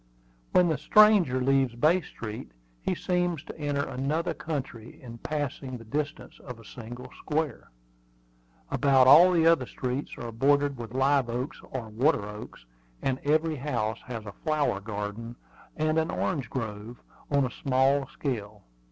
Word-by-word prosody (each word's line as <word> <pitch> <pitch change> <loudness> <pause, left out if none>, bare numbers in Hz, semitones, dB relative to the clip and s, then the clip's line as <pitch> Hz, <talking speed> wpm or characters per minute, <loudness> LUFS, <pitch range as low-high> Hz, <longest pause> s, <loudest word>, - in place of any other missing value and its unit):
When 180 -1 +5
the 155 -4 0
stranger 195 -6 +5
leaves 135 -2 +2
Bay 160 +9 +3
Street 110 - -8 0.3
he - - -1
seems 175 -4 -1
to - - -10
enter 145 -1 -1
another 150 +6 -1
country 130 -7 -6
in 115 -3 -10
passing 140 -3 -4
the 115 - -13
distance 145 +5 -4
of 125 -3 -9
a 115 - -15
single 120 +2 -9
square. 155 -4 -2 1.0
About 135 -2 +4
all 165 +8 +9
the 165 -2 +3
other 165 -7 +4
streets 130 +2 -4
are 120 -1 -6
bordered 140 +4 +2
with 115 +1 -7
live 135 -1 +3
oaks 125 +5 -4
or 120 -4 -5
water 110 -2 +1
oaks, 105 - -10 0.4
and 130 -1 0
every 155 +1 +1
house 120 -5 -2
has 115 -3 -6
a 100 - -8
flower 155 -10 +1
garden 105 +3 -5 0.4
and 155 +1 +2
an 160 - -1
orange 145 -8 -2
grove, 110 -1 -5 0.3
on 140 -2 +3
a 125 - -4
small 135 +1 +2
scale. 105 -9 -5
135 Hz, 150 wpm, -28 LUFS, 115-150 Hz, 1.0 s, all